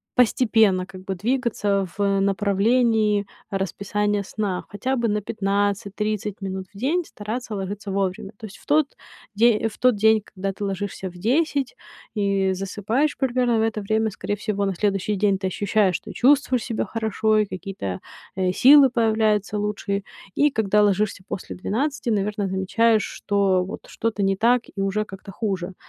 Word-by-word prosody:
постепенно, 220 -6 +3
как 185 0 -12
бы, 190 - -3
двигаться 210 -3 0
в 200 -1 +2
направлении 210 +2 +2 0.2
расписания 200 +2 -1
сна, 195 -2 -3
хотя 255 +6 -2
бы 235 - +1
на 210 -1 0
15-30 205 0 -2
минут 190 -1 -4
в - - -13
день 310 - 0
стараться 220 +1 -5
ложиться 200 +1 -5
вовремя. 195 +1 -2
То 220 - -9
есть 195 - -13
в - - -21
тот 295 -1 +1 0.4
де 225 +1 +3
в 215 - -15
тот 250 -2 +4
день, 220 +1 +4
когда 195 0 -4
ты 200 +1 -5
ложишься 195 -1 -4
в - - -15
10 275 - 0 0.4
и 200 -2 +1
засыпаешь 205 +9 -1
примерно 245 -3 +1
в - - +2
это 220 -1 0
время, 220 +2 +1
скорее 205 - -3
всего, 200 -1 -2
на 195 -1 -1
следующий 200 +1 0
день 200 -1 +2
ты 190 -1 -2
ощущаешь, 200 0 +1
что - - -6
чувствуешь 260 -2 +3
себя 230 -3 -2
хорошо 220 0 0
и 215 - +3
какие-то, 185 - -5 0.3
э, 185 -1 +1
силы 270 +7 +7
появляются 220 -3 +1
лучшие. 205 -1 -2 0.3
И 295 0 +3
когда 210 -3 +2
ложишься 205 -1 +1
после 190 - -6
12, 260 +7 -2
наверное, 205 -2 0
замечаешь, 215 +4 +2
что 195 -3 +1
вот 185 - -8
что-то 225 -2 -2
не 195 0 +2
так 240 +4 +3
и 195 - -2
уже 195 +2 0
как-то 195 0 -10
хуже. 190 -3 -3
205 Hz, 160 wpm, -23 LUFS, 195-225 Hz, 0.4 s, силы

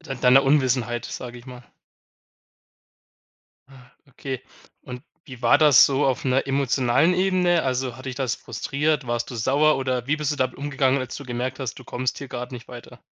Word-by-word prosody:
dei 145 -6 -7
deiner 125 +2 +5
Unwissenheit, 125 -4 +1
sage 120 -1 -7
ich 120 - -16
mal. 125 -1 -10 2.5
Okay, 130 -1 -6 0.4
und 125 -1 -8 0.2
wie 130 -5 -11
war 120 +4 +5
das 150 -4 +7
so 140 +1 0
auf 130 0 -1
'ner 130 +1 +1
emotionalen 135 +3 +2
Ebene? 180 -2 +2
Also, 130 -2 -2
hat 130 - -12
dich 130 - -4
das 130 -4 -1
frustriert? 150 -1 -2
Warst 120 0 -2
du - - -7
sauer 140 +6 +2
oder 130 -2 -2
wie 155 - +2
bist 150 -1 -2
du - - -2
damit 130 -2 -1
umgegangen, 140 -1 0
als 130 -1 -5
du 140 - -8
gemerkt 125 +2 -4
hast, 130 -2 -4
du - - -12
kommst 125 +1 -3
hier 140 - -7
grad 125 0 -6
nicht 120 -2 -9
weiter? 120 -1 -12
130 Hz, 185 wpm, -23 LUFS, 125-140 Hz, 2.5 s, das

